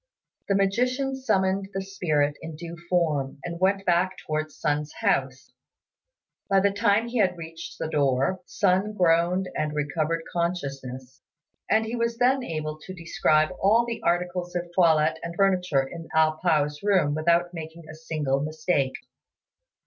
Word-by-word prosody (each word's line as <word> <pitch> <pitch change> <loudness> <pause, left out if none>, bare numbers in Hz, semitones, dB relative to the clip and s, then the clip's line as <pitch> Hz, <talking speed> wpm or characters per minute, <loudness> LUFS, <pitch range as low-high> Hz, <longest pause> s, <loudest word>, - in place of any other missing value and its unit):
The 200 - +2
magician 250 +7 +1
summoned 195 -6 0
the 195 - -1
spirit 155 -7 0
in 160 -1 -7
due 170 +1 -7
form, 155 -7 0
and 170 -1 -5
went 195 +1 +1
back 180 +1 +2
towards 155 0 -3
Sun's 150 -1 -1
house. 130 -1 -1 1.0
By 195 -1 +5
the 200 +1 +3
time 205 +2 +2
he 240 0 -2
had 185 -3 +2
reached 165 0 -8
the - - -3
door, 140 +4 +1
Sun 200 +1 +1
groaned 180 0 +2
and 150 -1 -2
recovered 155 +2 -1
consciousness; 135 -6 -4 0.5
and 220 +1 +3
he 225 +2 -3
was 235 0 -1
then 255 +2 +3
able 155 -4 -4
to 185 +4 -9
describe 155 -2 +2
all 225 +5 +4
the 235 -1 -4
articles 175 +1 -1
of 175 0 -3
toilette 160 -3 +3
and 170 0 -6
furniture 180 -7 +2
in 165 +2 -9
A 160 0 +5
pao's 150 -3 0
room 185 -8 +2
without 170 +3 +2
making 160 0 -8
a 160 - -9
single 155 -4 -2
mistake. 155 -2 0
170 Hz, 150 wpm, -26 LUFS, 155-195 Hz, 1.0 s, By